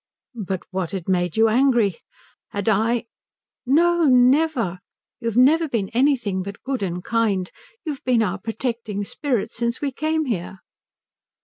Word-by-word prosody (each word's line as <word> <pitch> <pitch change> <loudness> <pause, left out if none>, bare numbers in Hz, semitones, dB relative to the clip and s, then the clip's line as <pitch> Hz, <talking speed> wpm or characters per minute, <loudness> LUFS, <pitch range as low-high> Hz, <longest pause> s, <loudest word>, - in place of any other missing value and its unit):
"But 190 -1 -3
what 185 -3 -2
had 185 -4 -5
made 180 -2 0
you 225 0 +5
angry? 235 -5 +2 0.5
Had 200 0 -5
I 225 +3 +2 0.3
?" - - -70 0.3
"No, 340 +4 +4
never. 255 - +3 0.4
You 230 - -4
have 230 0 -1
never 315 +6 +5
been 210 -7 -1
anything 240 -6 +1
but 200 +2 -8
good 270 -3 -3
and 180 -2 -3
kind. 210 -6 0 0.3
You've 295 -4 -5
been 245 -3 +3
our 195 -1 -2
protecting 225 -1 -3
spirit 245 +1 -2
since 235 0 -2
we 285 -2 -2
came 310 +3 -1
here." 190 -5 -4
230 Hz, 150 wpm, -22 LUFS, 195-265 Hz, 0.5 s, you